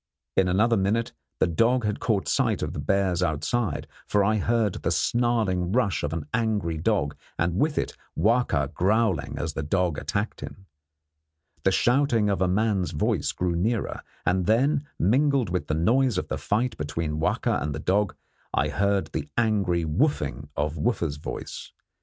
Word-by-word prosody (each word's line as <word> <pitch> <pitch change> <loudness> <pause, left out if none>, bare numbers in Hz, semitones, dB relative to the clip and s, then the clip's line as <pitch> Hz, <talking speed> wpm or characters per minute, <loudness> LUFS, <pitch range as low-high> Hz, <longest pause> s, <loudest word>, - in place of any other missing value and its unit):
In 95 - +3
another 110 +6 +3
minute 105 +4 0 0.3
the - - +4
dog 115 +8 +2
had 105 0 -1
caught 105 -5 0
sight - - +1
of - - -3
the - - -5
bears 95 +3 +1
outside, 85 +3 -1 0.2
for 105 -1 +3
I 110 +2 +2
heard 110 -1 +1
the - - 0
snarling 110 -7 +1
rush 100 - +1
of 75 - -2
an 80 -2 -3
angry 105 -8 0
dog, 80 -5 0 0.2
and 85 +1 0
with 150 0 +1
it - - -1 0.2
Wahka 105 - +2
growling 95 -4 +1
as 75 +1 -3
the - - -3
dog 85 0 0
attacked - - -3
him. 95 - -9 1.0
The 95 - +3
shouting 115 - +2
of 100 - 0
the 95 - +2
man's 100 -1 +1
voice 75 - 0
grew 90 -1 -1
nearer, 110 +6 -1 0.2
and 90 0 +1
then, 140 +6 +2
mingled 130 - +2
with 90 -1 -2
the 75 - 0
noise 120 +7 +2
of - - -3
the - - -2
fight 115 +3 0
between 75 +1 -3
Wahka - - 0
and 75 -1 -2
the - - -4
dog, 100 +4 +1 0.4
I - - +2
heard 100 0 0
the 150 - -4
angry 100 -7 +1
'wooffing' 75 - 0
of 75 +2 -1
Wooffa's 85 -6 0
voice. 75 - -7
95 Hz, 170 wpm, -26 LUFS, 85-115 Hz, 1.0 s, the